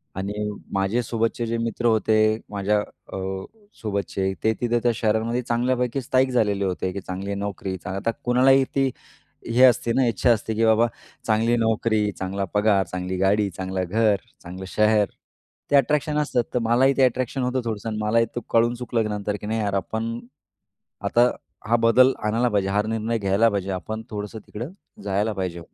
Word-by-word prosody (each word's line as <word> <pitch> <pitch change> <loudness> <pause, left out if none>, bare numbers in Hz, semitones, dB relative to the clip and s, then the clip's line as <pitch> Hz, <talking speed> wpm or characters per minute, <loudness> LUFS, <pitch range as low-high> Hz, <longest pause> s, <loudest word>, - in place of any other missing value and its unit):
आणि 105 +2 -3 0.2
माझे 95 +5 +1
सोबतचे 115 +1 -1
जे 115 +1 -1
मित्र 115 +1 -3
होते 110 -1 +3 0.3
माझ्या 105 +1 +1
अ, 105 - -9 0.6
सोबतचे 100 -2 -2
ते 110 0 +3
तिथं 120 -1 +1
त्या 120 - +4
शहरामध्ये 110 +2 0
चांगल्यापैकी 125 +1 0
स्थाईक 130 +2 +2
झालेले 105 -5 +1
होते, 95 0 -2
की 100 - -5
चांगली 95 +2 -5
नोकरी 100 -1 -4
चा 90 - -9
आता 110 +4 0
कुणालाही 130 +2 +5
ती 135 -1 +2 0.6
हे 125 - +5
असते 120 -2 +5
ना 135 - +3
इच्छा 120 +1 +2
असते 110 0 0
की 115 +1 +2
बाबा 110 +1 +4 0.4
चांगली 115 +2 +2
नोकरी 110 -2 +1
चांगला 95 +1 -2
पगार, 105 -2 +3
चांगली 90 +1 -4
गाडी, 100 +2 +2
चांगलं 95 +1 -3
घर, 110 +1 +3 0.3
चांगलं 90 +2 -8
शहर. 105 +1 +3 0.7
ते - - +5
अट्रॅक्शन 150 +2 +2
असतात 125 -5 +1
तर 125 - +2
मलाही 125 +4 +4
ते 135 - +5
अट्रॅक्शन 130 +1 0
होतं 125 +1 0
थोडंसं 110 -1 -3
आणि 110 - -3
मलाही 115 +2 +3
ते - - 0
कळून 115 +1 +3
चुकलं 120 -2 -1
नंतर 105 0 -2
की 105 - -6
नाही 110 +1 -1
यार 100 -2 -1
आपण, 110 +4 -2 0.8
आता 120 +1 +3 0.4
हा 120 - +5
बदल 130 +3 +6
आणायला 115 +3 +2
पाहिजे 100 -3 0
हा 105 +2 +1
निर्णय 110 +1 -1
घ्यायला 100 +3 +3
पाहिजे. 100 -2 -2
आपण 110 +4 -4
थोडंसं 105 +1 -5
तिकडं 120 +9 -6 0.3
जायला 100 +2 0
पाहिजे. 90 -3 -3
110 Hz, 175 wpm, -24 LUFS, 100-120 Hz, 0.8 s, बदल